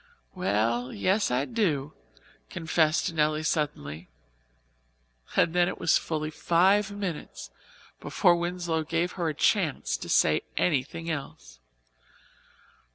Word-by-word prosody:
"Well, 115 Hz, +5 st, 0 dB
yes, 190 Hz, -, +1 dB
I 125 Hz, +3 st, 0 dB
do," 155 Hz, -, -1 dB, 0.6 s
confessed 160 Hz, 0 st, +1 dB
Nelly 155 Hz, 0 st, +1 dB
suddenly; 90 Hz, -, -2 dB, 1.3 s
and 165 Hz, -, +3 dB
then 175 Hz, 0 st, +3 dB
it -, -, -4 dB
was -, -, +3 dB
fully 155 Hz, -1 st, -3 dB
five 190 Hz, +6 st, +3 dB
minutes 195 Hz, -6 st, -6 dB, 0.5 s
before 175 Hz, -4 st, +3 dB
Winslow 175 Hz, -2 st, -2 dB
gave 170 Hz, +3 st, -1 dB
her 170 Hz, -3 st, -2 dB
a 155 Hz, -, -4 dB
chance -, -, +1 dB
to -, -, -8 dB
say -, -, +3 dB, 0.2 s
anything 160 Hz, +1 st, 0 dB
else. -, -, -7 dB
160 Hz, 110 wpm, -27 LUFS, 140-175 Hz, 1.3 s, and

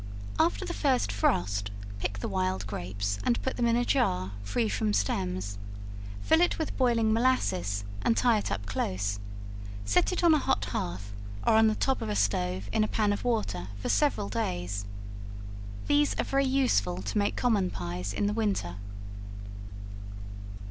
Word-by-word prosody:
After 100 Hz, -, +3 dB
the -, -, -3 dB
first 100 Hz, 0 st, +2 dB
frost, 100 Hz, 0 st, +1 dB, 0.3 s
pick 100 Hz, 0 st, -2 dB
the 100 Hz, -, -3 dB
wild 95 Hz, 0 st, 0 dB
grapes, 100 Hz, +1 st, -3 dB
and 240 Hz, -, +2 dB
put 260 Hz, -, -1 dB
them 240 Hz, -1 st, +2 dB
in 230 Hz, -, +4 dB
a 245 Hz, 0 st, +2 dB
jar, 95 Hz, -, +2 dB
free 105 Hz, +3 st, 0 dB
from 105 Hz, +1 st, 0 dB
stems; 100 Hz, -1 st, -1 dB, 0.6 s
fill 320 Hz, +1 st, +5 dB
it 355 Hz, -, +3 dB
with 315 Hz, -, -2 dB
boiling 230 Hz, -4 st, +3 dB
molasses, 100 Hz, -, +2 dB, 0.2 s
and 230 Hz, -, +2 dB
tie 235 Hz, -3 st, +4 dB
it -, -, -3 dB
up 100 Hz, 0 st, -2 dB
close; 100 Hz, 0 st, -1 dB, 0.7 s
set 100 Hz, -, +3 dB
it 365 Hz, -, -1 dB
on 335 Hz, -2 st, +7 dB
a 305 Hz, -, +5 dB
hot 105 Hz, -, +1 dB
hearth, 100 Hz, 0 st, -3 dB, 0.3 s
or -, -, +5 dB
on 220 Hz, 0 st, +6 dB
the 215 Hz, -, +2 dB
top 265 Hz, +3 st, +1 dB
of -, -, -2 dB
a 105 Hz, -, 0 dB
stove, 95 Hz, -2 st, +1 dB
in 215 Hz, -, +4 dB
a -, -, +1 dB
pan 210 Hz, -2 st, +2 dB
of 205 Hz, -, -4 dB
water, 210 Hz, -, 0 dB
for 100 Hz, -, -3 dB
several 290 Hz, -, +2 dB
days. 100 Hz, 0 st, -2 dB, 1.0 s
These 290 Hz, 0 st, +3 dB
are -, -, +3 dB
very 275 Hz, 0 st, +2 dB
useful 100 Hz, -, +2 dB
to 100 Hz, -, -2 dB
make 205 Hz, -, +1 dB
common 210 Hz, -7 st, +2 dB
pies 90 Hz, -, -3 dB
in 205 Hz, -, 0 dB
the 205 Hz, -, +1 dB
winter. 200 Hz, -, 0 dB
100 Hz, 170 wpm, -29 LUFS, -, 1.0 s, on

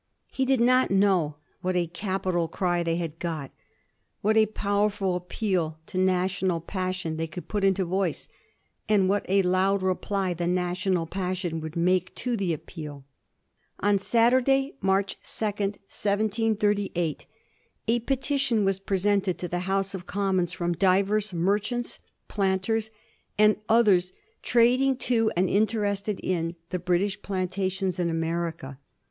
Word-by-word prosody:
He 265 Hz, -, 0 dB
did 265 Hz, -1 st, +2 dB
not 255 Hz, +2 st, +4 dB
know 190 Hz, -6 st, +2 dB, 0.3 s
what 185 Hz, 0 st, -1 dB
a 175 Hz, -1 st, +2 dB
capital 185 Hz, -1 st, -2 dB
cry 175 Hz, 0 st, 0 dB
they 165 Hz, -1 st, 0 dB
had 165 Hz, -2 st, -4 dB
got, 160 Hz, -6 st, -4 dB, 0.7 s
what 215 Hz, +2 st, +2 dB
a 220 Hz, -1 st, +5 dB
powerful 200 Hz, -2 st, 0 dB
appeal 180 Hz, -3 st, -2 dB
to 185 Hz, -, -4 dB
national 185 Hz, -1 st, +1 dB
passion 185 Hz, -2 st, -3 dB
they 165 Hz, 0 st, -2 dB
could 175 Hz, +2 st, -8 dB
put 205 Hz, -2 st, -2 dB
into 195 Hz, -1 st, +2 dB
voice, 185 Hz, -2 st, -1 dB, 0.6 s
and 200 Hz, -3 st, +4 dB
what 200 Hz, +1 st, +1 dB
a 195 Hz, +1 st, +4 dB
loud 185 Hz, +2 st, +2 dB
reply 190 Hz, 0 st, 0 dB
the 175 Hz, 0 st, -2 dB
national 180 Hz, 0 st, 0 dB
passion 180 Hz, -2 st, -3 dB
would 160 Hz, +1 st, -7 dB
make 180 Hz, +1 st, +1 dB
to 245 Hz, -1 st, -2 dB
the 195 Hz, -5 st, -1 dB
appeal. 150 Hz, -3 st, -7 dB, 0.7 s
On 205 Hz, 0 st, +2 dB
Saturday, 255 Hz, +6 st, +3 dB
March 195 Hz, +1 st, +1 dB
2, 220 Hz, -, -4 dB
1738, 205 Hz, -2 st, -1 dB, 0.6 s
a 235 Hz, +2 st, +3 dB
petition 265 Hz, -3 st, +1 dB
was 195 Hz, 0 st, +1 dB
presented 195 Hz, -2 st, +1 dB
to 180 Hz, -, -4 dB
the 175 Hz, +1 st, -2 dB
House 195 Hz, 0 st, 0 dB
of 185 Hz, -2 st, -7 dB
Commons 190 Hz, -3 st, 0 dB
from 175 Hz, -1 st, -1 dB
divers 195 Hz, +3 st, +2 dB
merchants, 205 Hz, +7 st, -1 dB, 0.3 s
planters, 200 Hz, +3 st, 0 dB, 0.5 s
and 210 Hz, 0 st, +5 dB
others 200 Hz, -6 st, +4 dB, 0.3 s
trading 250 Hz, +3 st, +3 dB
to 235 Hz, -3 st, +1 dB
and 185 Hz, +1 st, +3 dB
interested 205 Hz, 0 st, 0 dB
in 170 Hz, -2 st, -1 dB, 0.2 s
the 180 Hz, -, -1 dB
British 185 Hz, +3 st, 0 dB
plantations 190 Hz, -1 st, -2 dB
in 175 Hz, -1 st, +1 dB
America. 165 Hz, -4 st, -3 dB
190 Hz, 135 wpm, -26 LUFS, 175-210 Hz, 0.7 s, a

